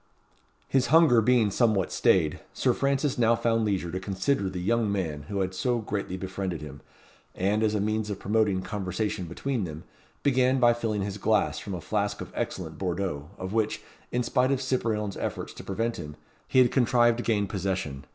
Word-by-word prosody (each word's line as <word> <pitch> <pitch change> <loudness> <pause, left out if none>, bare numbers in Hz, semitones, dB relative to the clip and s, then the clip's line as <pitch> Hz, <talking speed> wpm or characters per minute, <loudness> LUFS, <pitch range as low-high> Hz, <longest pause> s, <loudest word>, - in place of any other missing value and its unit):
His 130 -2 +2
hunger 150 -5 +6
being 115 -2 +3
somewhat 105 -5 +2
stayed, 80 -5 +2 0.2
Sir - - +2
Francis 140 -1 0
now 115 0 +4
found 115 -1 +1
leisure 95 -5 -1
to 95 - -3
consider 95 +3 0
the 95 -1 -5
young 110 +3 +1
man 80 -7 -2
who 100 -1 -1
had 95 0 -1
so 120 +7 0
greatly 100 -4 -3
befriended 95 -2 -4
him, 70 -2 -9 0.5
and, 100 +4 +1
as 110 -1 +2
a - - +1
means 110 +1 -1
of 100 - -3
promoting 100 -2 +1
conversation 95 0 -3
between 115 +8 -2
them, 80 -2 -6 0.4
began 130 -1 +3
by 120 -1 +6
filling 110 -4 -2
his 100 +1 -4
glass 110 +1 +1
from 100 - -5
a 85 - -6
flask - - -1
of - - -7
excellent - - -4
Bordeaux, 90 -5 -2
of 95 +2 -5
which, 110 -1 0 0.3
in 125 0 0
spite 125 +1 +2
of 135 - +1
Cyprien's 115 -6 -1
efforts - - -4
to - - -10
prevent 115 +4 -2
him, 75 -1 -7 0.3
he - - 0
had 125 -2 +6
contrived 120 -2 +3
to - - -2
gain 105 -3 +1
possession. 95 -8 -3
105 Hz, 190 wpm, -27 LUFS, 95-120 Hz, 0.5 s, hunger